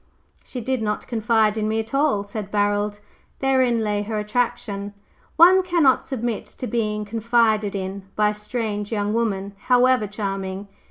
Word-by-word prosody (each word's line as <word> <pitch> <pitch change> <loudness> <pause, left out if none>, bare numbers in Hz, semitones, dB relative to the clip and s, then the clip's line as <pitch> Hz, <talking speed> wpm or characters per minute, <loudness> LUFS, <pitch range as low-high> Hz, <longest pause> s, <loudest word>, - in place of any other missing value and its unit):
"She 250 - -7
did 260 +1 -1
not 210 -1 -2
confide 220 -2 +1
in 215 - 0
me 220 +1 0
at 225 +2 -5
all," 275 -7 +2
said 205 0 -6
Barold. 205 0 0 0.4
"Therein 260 -4 +2
lay 210 -1 0
her 215 +1 -3
attraction. 210 -2 -2 0.4
One 360 +3 +7
cannot 340 -8 +3
submit 240 -4 -3
to - - -7
being 210 -3 -1
'confided 220 -1 +1
in' 195 0 -5
by 210 0 +3
a - - -2
strange 210 -1 -4
young 205 -1 -1
woman, 200 -4 -1
however 250 -3 +4
charming. 195 -1 -4
215 Hz, 155 wpm, -23 LUFS, 205-240 Hz, 0.4 s, One